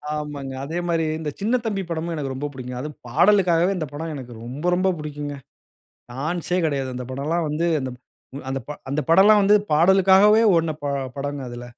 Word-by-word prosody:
ஆமங்க. 145 -3 -5
அதே 165 +4 -3
மாரி 165 -1 +1
இந்த 155 -2 -3
சின்னத்தம்பி 220 -3 0
படமும் 165 +1 -3
எனக்கு 135 -3 -3
ரொம்ப 145 +2 -3
பிடிக்குங்க. 125 -1 -6
அதுவும் 150 0 -7
பாடலுக்காகவே 180 - +3
இந்த 155 -3 -3
படம் 160 +1 -5
எனக்கு 125 -3 -8
ரொம்ப, 140 +7 -6
ரொம்ப 190 +1 +2
பிடிக்குங்க. 145 -1 -5 0.8
டான்ஸ்சே 170 +6 -2
கெடயாது. 135 -3 -2
அந்த 125 - -5
படம்லாம் 155 +5 -1
வந்து 160 +3 -1
அந் 130 -1 -4 0.6
அந்த 135 0 -2
ப - - -6 0.2
அந்த 140 +3 -1
படம்லாம் 205 +5 +6
வந்து 205 +2 +5 0.2
பாடலுக்காகவே 190 +6 +5
ஓடுன 165 -1 +2
ப - - -3 0.3
படங்க 140 0 -4
அதுல. 120 0 -8
155 Hz, 170 wpm, -23 LUFS, 140-180 Hz, 0.8 s, படம்லாம்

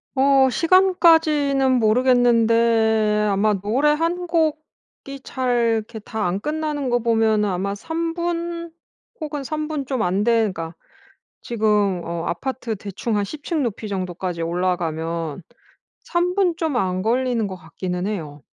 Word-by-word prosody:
어 270 0 +4
시간까지는 320 -5 +3
모르겠는데 230 -2 +3
아마 205 +2 +2
노래 215 +9 +1
1 335 +3 -1
곡이 310 -4 -3
잘 240 -3 0
이렇게 220 +1 -5
다 220 0 -4
안 180 +2 -1
끝나는 300 +1 -2
거 245 0 +2
보면 225 -2 +2
아마 195 +1 -2
3분 335 +4 -3 0.5
혹은 295 -2 -4
3 305 +2 -3
분 300 -3 -3
좀 260 -2 -2
안 185 +3 +1
되 230 0 +3
그니까 170 -6 -3 0.7
지금 210 -5 +1
어 170 0 -4
아파트 230 +5 -3
대충 205 +3 -3
한 205 - +1
10 295 +8 -9
층 320 -4 -1
높이 220 -3 -3
정도까지 185 -3 -4
올라가면 165 -2 -2 0.6
3 350 +1 0
분 370 -4 +2
좀 320 -5 -1
안 185 -5 0
걸리는 240 -1 +1
것 190 - -6
같기는 180 +1 -5
해요. 155 -9 -5
230 Hz, 235 characters per minute, -22 LUFS, 195-295 Hz, 0.7 s, 어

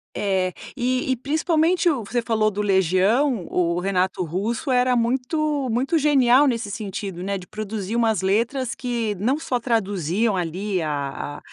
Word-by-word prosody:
É, 190 -3 0 0.2
e 255 0 0
e - - +2
principalmente, 320 +6 +1
o 275 -8 -1
você 235 +4 -1
falou 220 -2 +1
do 210 0 -3
Legião. 195 - +2
O 170 -1 0
Renato 185 0 0
Russo 215 - -2
era 250 0 +3
muito 265 +4 0
muito 255 +8 +1
genial 275 -2 +5
nesse 230 -5 -1
sentido, 195 -3 -5
né? 200 +2 -2
De 180 - -10
produzir 215 0 -5
umas 225 -4 +2
letras 235 +6 0
que 235 -4 -2
não 250 +8 +1
só 255 -6 -1
traduziam 205 - 0
ali 185 +2 -2
a 145 -1 -4
225 Hz, 150 wpm, -23 LUFS, 190-255 Hz, 0.2 s, genial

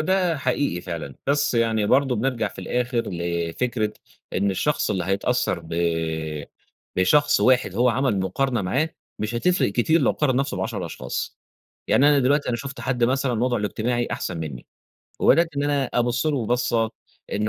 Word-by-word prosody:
ده 185 -3 +1
حقيقي 140 -9 0
فعلًا. 85 -6 -6
بس 140 -1 +2
يعني 115 -2 +2
برضه 130 +2 +3
بنرجع 120 0 0
في - - -16
الآخر 125 -1 -1
لفكرة 85 +7 -1 0.4
إن 100 +1 +1
الشخص 145 +9 0
اللي 95 -3 -1
هيتأثّر 95 +1 0
ب 80 - -6 1.2
بشخص 145 +11 +4
واحد 125 -7 +3
هو 125 +4 +3
عمل 125 -5 +1
مقارنة 120 +5 0
معاه، 135 - 0 0.3
مش 110 +2 -3
هتفرق 180 +10 +2
كتير 160 +9 +3
لو 135 - +3
قارن 130 -4 +1
نفسه 140 +1 0
ب10 - - -3
أشخاص. 65 -1 -5 0.5
يعني 145 - +5
أنا 145 -1 +5
دلوقتي 140 +2 +2
أنا 120 - 0
شُفت 140 +3 -7
حد 125 -2 0
مثلًا 130 +1 +1
وضعه 125 -2 +1
الاجتماعي 120 +3 -1
أحسن 90 - -3
منّي، 70 -6 -6 0.5
وبدأت 170 0 +5
إن 140 - 0
أنا 145 -3 0
أبُص 120 +4 +1
له 140 -7 0
بصّة 115 -1 +1 0.4
إن 105 +1 0
120 Hz, 160 wpm, -23 LUFS, 105-140 Hz, 1.2 s, يعني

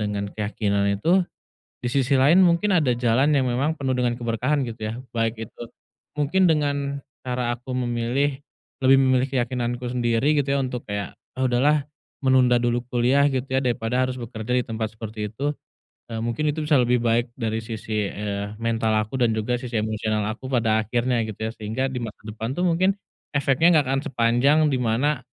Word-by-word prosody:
dengan 105 -1 -2
keyakinan 100 -1 0
itu, 175 - +3 0.6
di - - +1
sisi 135 0 +2
lain 150 +8 +5
mungkin 175 +4 +3
ada 140 -7 +3
jalan 120 +4 +2
yang 130 - +2
memang 145 +6 0
penuh 130 -2 -1
dengan 120 -1 0
keberkahan 125 +4 0
gitu 110 -2 -5
ya. 110 - -4 0.2
Baik 115 -1 0 0.2
itu - - -10 0.5
mungkin 175 +6 +3
dengan 140 -2 0 0.2
cara 125 -1 -1
aku 125 +1 -6
memilih, 125 +3 -1 0.4
lebih 135 0 +6
memilih 130 0 +3
keyakinanku 125 -1 -2
sendiri 120 +3 +2
gitu 140 - -3
ya - - +1
untuk 125 -3 -5
kayak, 100 -1 -3 0.2
ah 130 - 0
udahlah 140 +4 +2 0.4
menunda 125 -2 +4
dulu 120 0 0
kuliah 125 +4 +3
gitu 130 0 -2
ya 130 - +3
daripada 125 0 0
harus 130 0 -5
bekerja 115 -1 -7
di 125 -1 +2
tempat 110 -1 -3
seperti 110 -2 -5
itu, 145 +6 -2 0.6
eee, 115 - -4
mungkin 120 +6 -1
itu 150 +1 -2
bisa 145 -4 +4
lebih 125 0 +3
baik 120 +1 +2
dari 115 -1 -2
sisi, 110 -2 -3
eee, 105 0 -4
mental 115 -1 0 0.2
aku 130 +4 -5
dan 115 -2 +4
juga 110 +3 -1
sisi 120 -3 -3
emosional 110 0 -1
aku, 130 +3 -9
pada 110 -4 +2
akhirnya 120 +2 0
gitu 105 - -7
ya. - - -6
Sehingga 110 +5 -3
di 125 - -3
masa 110 -3 -6
depan 115 +6 -5
tuh 180 - +1
mungkin 185 +4 +2 0.4
efeknya 140 +5 +3
gak 145 - 0
akan 135 0 +1
sepanjang 120 +5 +3
di - - +2
mana 125 +5 +1
125 Hz, 180 wpm, -24 LUFS, 115-135 Hz, 0.6 s, lebih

